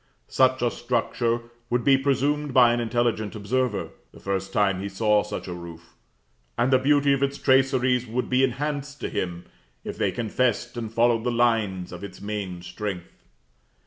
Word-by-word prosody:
Such 130 Hz, -1 st, +3 dB
a 120 Hz, -, +2 dB
structure 120 Hz, -1 st, -1 dB, 0.3 s
would 120 Hz, 0 st, +1 dB
be 135 Hz, +2 st, +6 dB
presumed 140 Hz, +1 st, 0 dB
by 120 Hz, -2 st, +7 dB
an 120 Hz, -, 0 dB
intelligent 115 Hz, -2 st, -1 dB
observer, 110 Hz, +1 st, -1 dB, 0.2 s
the -, -, -15 dB
first 95 Hz, 0 st, -3 dB
time 95 Hz, -2 st, +1 dB
he 100 Hz, -, -4 dB
saw 105 Hz, +1 st, +2 dB
such 105 Hz, -, -6 dB
a 90 Hz, -, -4 dB
roof; 85 Hz, -1 st, -10 dB, 0.6 s
and 120 Hz, +3 st, +2 dB
the 130 Hz, -, +6 dB
beauty 140 Hz, +1 st, +3 dB
of 135 Hz, -, -1 dB
its 140 Hz, 0 st, 0 dB
traceries 130 Hz, -2 st, +2 dB
would 125 Hz, +3 st, -2 dB
be 130 Hz, +1 st, +2 dB
enhanced 145 Hz, +2 st, -2 dB
to -, -, -2 dB
him 85 Hz, -1 st, -4 dB, 0.4 s
if -, -, -7 dB
they -, -, +1 dB
confessed 120 Hz, +1 st, -1 dB
and 115 Hz, -2 st, -5 dB
followed 115 Hz, 0 st, +2 dB
the 125 Hz, -, 0 dB
lines 110 Hz, -6 st, +1 dB
of 90 Hz, +1 st, -8 dB
its 100 Hz, -, -8 dB
main 100 Hz, -4 st, -5 dB
strength. 90 Hz, 0 st, -7 dB
120 Hz, 175 wpm, -25 LUFS, 100-130 Hz, 0.6 s, by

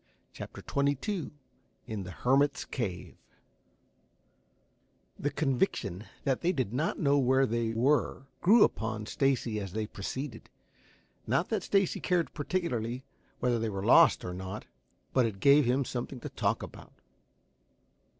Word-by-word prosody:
CHAPTER -, -, -9 dB
XXII 145 Hz, -, -1 dB, 0.6 s
IN 110 Hz, -2 st, -4 dB
THE 95 Hz, -, -7 dB
HERMIT'S 140 Hz, +8 st, +1 dB
CAVE 95 Hz, -9 st, -4 dB, 2.0 s
The 145 Hz, -, 0 dB
conviction 130 Hz, -, -1 dB, 0.2 s
that 135 Hz, -2 st, 0 dB
they 175 Hz, -, +2 dB
did 130 Hz, -, -2 dB
not 150 Hz, +6 st, 0 dB
know 145 Hz, -3 st, +3 dB
where 130 Hz, +1 st, +4 dB
they 115 Hz, -1 st, -1 dB
were 135 Hz, +2 st, +1 dB, 0.2 s
grew 210 Hz, +5 st, +7 dB
upon 110 Hz, -1 st, -1 dB
Stacy 125 Hz, -4 st, 0 dB
as 100 Hz, -3 st, -6 dB
they 110 Hz, 0 st, -1 dB
proceeded. 115 Hz, +5 st, -6 dB, 0.8 s
Not -, -, +1 dB
that -, -, 0 dB
Stacy 195 Hz, -3 st, +1 dB
cared 175 Hz, -2 st, 0 dB
particularly 130 Hz, -7 st, -2 dB, 0.4 s
whether 120 Hz, -2 st, +2 dB
they 115 Hz, 0 st, -1 dB
were 100 Hz, -1 st, -4 dB
lost -, -, +6 dB
or 90 Hz, -, -4 dB
not, 95 Hz, +3 st, -6 dB, 0.5 s
but 130 Hz, -3 st, +4 dB
it 100 Hz, -3 st, -6 dB
gave 140 Hz, +5 st, +6 dB
him 130 Hz, +3 st, +2 dB
something 125 Hz, +1 st, -5 dB
to -, -, -5 dB
talk -, -, -1 dB
about. -, -, -11 dB
130 Hz, 135 wpm, -30 LUFS, 110-145 Hz, 2.0 s, grew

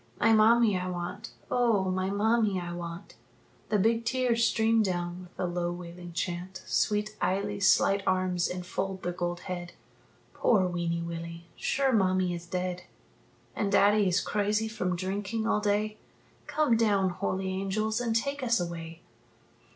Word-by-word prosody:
"My 225 Hz, +1 st, +5 dB
mammie 220 Hz, 0 st, +5 dB
I 180 Hz, -, -3 dB
want; 180 Hz, +4 st, -5 dB, 0.2 s
oh! 220 Hz, -6 st, +2 dB
my 185 Hz, +1 st, -1 dB
mammie 210 Hz, -1 st, +2 dB
I 175 Hz, -1 st, -5 dB
want!" 170 Hz, +1 st, -7 dB, 0.6 s
The 210 Hz, -, +2 dB
big 225 Hz, +3 st, +2 dB
tears 240 Hz, -1 st, +1 dB
stream 225 Hz, 0 st, +3 dB
down 175 Hz, -2 st, -2 dB
with 180 Hz, -1 st, -14 dB
the -, -, -2 dB
low 175 Hz, 0 st, -1 dB
wailing 175 Hz, 0 st, -8 dB
chant. 180 Hz, +2 st, -4 dB
Sweet 210 Hz, 0 st, 0 dB
Eily's 200 Hz, 0 st, +1 dB
slight 195 Hz, +2 st, +4 dB
arms 185 Hz, -1 st, +1 dB
enfold 185 Hz, +1 st, -4 dB
the 175 Hz, -, -1 dB
gold 175 Hz, 0 st, -3 dB
head: 175 Hz, -1 st, -6 dB, 0.6 s
"Poor 205 Hz, -6 st, +3 dB
weeny 170 Hz, -1 st, -1 dB
Willie, 170 Hz, 0 st, -6 dB
sure 270 Hz, -1 st, +1 dB
mammie 185 Hz, -3 st, +2 dB
is 170 Hz, 0 st, -7 dB
dead 180 Hz, 0 st, -3 dB, 0.7 s
And 200 Hz, -1 st, -1 dB
daddie 205 Hz, 0 st, +4 dB
is 180 Hz, +1 st, +2 dB
crazy 210 Hz, +1 st, 0 dB
from 185 Hz, -5 st, -2 dB
drinking 200 Hz, +4 st, -3 dB
all 225 Hz, -, +2 dB
day 210 Hz, +1 st, 0 dB, 0.5 s
Come 300 Hz, -6 st, +2 dB
down, 200 Hz, -4 st, +2 dB
holy 190 Hz, 0 st, -2 dB
angels, 205 Hz, +4 st, -1 dB
and 230 Hz, -2 st, -1 dB
take 280 Hz, +5 st, -1 dB
us 235 Hz, -2 st, +2 dB
away!" 165 Hz, -1 st, -6 dB
190 Hz, 150 wpm, -29 LUFS, 175-215 Hz, 0.7 s, My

